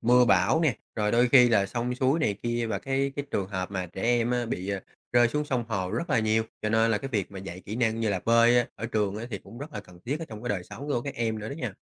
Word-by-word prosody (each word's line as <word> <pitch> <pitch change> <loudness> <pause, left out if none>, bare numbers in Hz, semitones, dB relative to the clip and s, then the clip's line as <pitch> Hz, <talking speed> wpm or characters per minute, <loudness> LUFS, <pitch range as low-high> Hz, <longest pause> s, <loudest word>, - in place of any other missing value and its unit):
mưa 125 +2 +5
bão 95 - +4
nè, 155 -9 +2 0.2
rồi 105 -1 0
đôi 120 +1 +4
khi 125 -1 +7
là 100 -4 +3
sông 120 +4 -2
suối 130 +4 +2
này 105 -8 +1
kia 120 0 -1
và 105 -3 -2
cái 135 +4 -1
cái 145 - -2
trường 95 -2 -1
hợp 95 -2 -3
mà 95 -2 -3
trẻ 90 +2 -8
em 120 0 +2
á, 120 -1 0
bị, 95 -4 -4
ờ, 100 -1 -1 0.3
rơi 120 -1 +5
xuống 150 +5 -1
sông 125 -5 -1
hồ 95 -5 -2
rất 125 - -3
là 135 - +3
nhiều. 110 0 +2 0.2
Cho 110 - 0
nên 110 +1 +3
là 110 - +2
cái 135 - -5
việc 105 -8 -2
mà 100 - -8
dạy 95 -1 -7
kỹ 105 - -4
năng 115 -2 +1
như 115 - +1
là 95 -3 0
bơi 115 +1 +5
á, 120 - +2
ở 115 - -5
trường 105 -3 -1
á, 110 +2 -5
thì 100 - -3
cũng 115 - -13
rất 145 +3 -8
là - - -5
cần 90 -1 -16
thiết 140 +5 -1
ở 165 - -5
trong 110 -1 -9
cái 125 - -4
đời 100 -5 -1
sống 105 +9 -9
của 140 -5 0
các 140 0 -5
em 115 -4 -1
nữa 105 +1 -5
đó - - -5
nha. 125 -10 -4
115 Hz, 315 wpm, -27 LUFS, 100-125 Hz, 0.3 s, khi